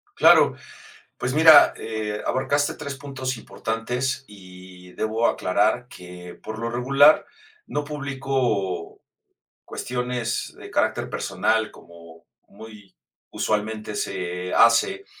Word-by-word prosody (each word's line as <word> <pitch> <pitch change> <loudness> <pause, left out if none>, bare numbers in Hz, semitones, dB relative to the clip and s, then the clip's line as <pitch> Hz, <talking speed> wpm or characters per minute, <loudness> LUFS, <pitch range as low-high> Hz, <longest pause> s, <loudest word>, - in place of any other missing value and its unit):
Claro, - - +6 0.6
pues 125 +2 -2
mira, 155 -1 +8
eh, 110 -1 -4
abarcaste 145 +2 0
3 140 -1 -6
puntos 130 -2 -5
importantes 120 +4 -3
y 90 -2 -14
debo 110 +2 0
aclarar 110 +6 0
que 90 0 -11
por 110 0 -7
lo 115 +1 -3
regular 140 +5 +4 0.4
no 145 - -3
publico 135 - -2 0.6
cuestiones 125 -2 -3
de - - -11
carácter - - 0
personal 110 -1 -1
como 85 -1 -16 0.2
muy 105 -2 -14 0.4
usualmente 105 0 -2
se 90 0 -4
hace 390 - +4
115 Hz, 105 wpm, -23 LUFS, 100-130 Hz, 0.6 s, mira